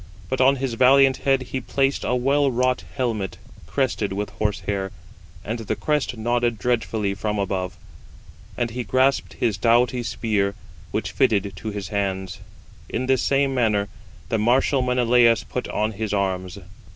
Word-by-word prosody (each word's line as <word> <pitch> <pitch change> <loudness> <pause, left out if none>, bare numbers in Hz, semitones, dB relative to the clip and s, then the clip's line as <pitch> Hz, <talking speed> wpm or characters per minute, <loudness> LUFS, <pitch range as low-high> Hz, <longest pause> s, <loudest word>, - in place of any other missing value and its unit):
But 130 - 0
on 135 +2 +5
his 130 -2 -2
valiant 130 +2 +5
head 135 -1 +1
he 130 +1 -4
placed 135 +2 0
a 125 - 0
well 140 +3 +2
wrought 125 0 +1
helmet, 110 -8 -2 0.3
crested 105 - -1
with 100 +2 -3
horse 105 -1 -2
hair, 95 -2 -2 0.5
and 115 +3 -3
the 110 - -2
crest 150 -5 -1
nodded 120 +1 0
dreadfully 110 -2 0
from 105 +1 -2
above; 95 -1 -2 0.8
and 120 -1 -1
he 125 +2 -3
grasped 130 +2 +1
his 110 -4 0
doughty 120 +2 +3
spear, 105 -4 -1 0.3
which 110 - -3
fitted 105 -7 +1
to 110 - -5
his 100 -2 -5
hands. 95 -3 -2 0.5
In 125 - -2
this 130 0 +2
same 140 0 +2
manner 105 -5 +1 0.4
the 115 - 0
martial 130 +4 +3
Menelaus 125 -2 +3
put 125 - -4
on 110 +1 -1
his 105 0 -3
arms. 95 -1 -2
115 Hz, 155 wpm, -23 LUFS, 100-130 Hz, 0.8 s, on